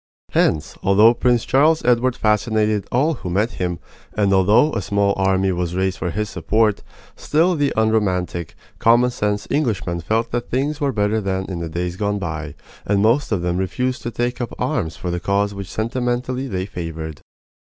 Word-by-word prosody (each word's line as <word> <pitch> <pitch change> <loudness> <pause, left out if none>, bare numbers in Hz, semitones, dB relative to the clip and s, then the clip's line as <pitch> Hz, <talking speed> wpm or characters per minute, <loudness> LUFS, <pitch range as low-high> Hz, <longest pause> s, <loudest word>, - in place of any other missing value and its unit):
Hence, 75 -1 +1
although 105 +4 +5
Prince 120 -1 +1
Charles 155 +4 +3
Edward 125 0 +3
fascinated 105 -2 +1
all 145 +7 +2
who 90 - -4
met 105 +6 +1
him, 90 -1 -1 0.4
and 100 -2 +2
although 105 +10 +4
a - - -1
small 100 0 +1
army 95 0 +1
was 90 -1 -2
raised 95 0 -1
for 90 - -2
his 105 +5 -2
support, 110 -1 +1 0.3
still 165 +4 +2
the 145 -2 +1
unromantic, 95 -6 0 0.2
common 120 +2 +4
sense 105 -3 -2
Englishmen 105 - 0
felt 110 +7 -1
that 120 0 -3
things 145 +4 -1
were 140 -1 +1
better 105 -1 0
than 95 -1 -2
in 90 -3 -5
the 85 -1 -4
days 90 +2 -3
gone 105 0 -1
by, 80 -5 -5 0.3
and 100 0 +1
most 120 +6 +2
of 95 -5 0
them 90 0 0
refused 125 +7 -2
to 120 - -3
take 120 +1 -2
up 120 - -4
arms 80 - -2
for 90 - -4
the 90 - -2
cause 100 +3 0
which 100 -1 -7
sentimentally 125 +3 -2
they 95 -5 -3
favored. 80 -5 -6
105 Hz, 180 wpm, -20 LUFS, 95-120 Hz, 0.4 s, although